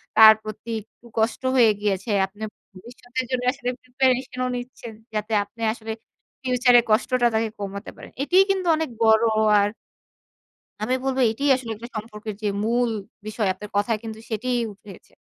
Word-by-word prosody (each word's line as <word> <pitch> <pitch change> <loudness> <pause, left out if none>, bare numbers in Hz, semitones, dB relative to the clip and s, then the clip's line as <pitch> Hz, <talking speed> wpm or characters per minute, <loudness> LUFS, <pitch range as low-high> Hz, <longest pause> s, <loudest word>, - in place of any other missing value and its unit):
তার 220 0 +10
প্রতি 215 +1 -8
একটু 225 - -28
কষ্ট 225 +1 +1
হয়ে 240 -4 +6
গিয়েছে। 205 0 -1 0.2
আপনি 200 +3 -17 0.3
ভবিষ্যতের 245 +5 -6
জন্য 250 -1 0
আসলে 250 -3 -4
প্রিপারেশন 255 0 0
ও - - 0
নিচ্ছেন 245 -2 -7 0.2
যাতে 215 +1 -2
আপনি 230 +3 -16
আসলে 225 -1 -7 0.5
ফিউচার 250 -1 +3
এ - - +3
কষ্টটা 240 +3 +3
তাকে 220 0 +1
কমাতে 200 +1 -6
পারেন। - - -12
এটিই 365 +6 +5
কিন্তু 380 -2 -1
অনেক 315 -1 -2
বড় 220 0 +5 0.4
আর 200 - +2 1.1
আমি 230 +4 0
বলব 265 -1 -1
এটাই 280 +6 -1
আসলে 245 -3 -5
একটা 235 +3 -10
সম্পর্কের 215 -1 -6
যে 210 - -1 0.2
মূল 240 +2 +1 0.4
বিষয়, 215 -1 -1
আপনার 210 +2 -10
কথায় 215 +2 +1
কিন্তু 220 -1 -7
সেটিই 245 +2 -1
উঠেছে। 200 -1 -15
230 Hz, 160 wpm, -24 LUFS, 215-250 Hz, 1.1 s, তার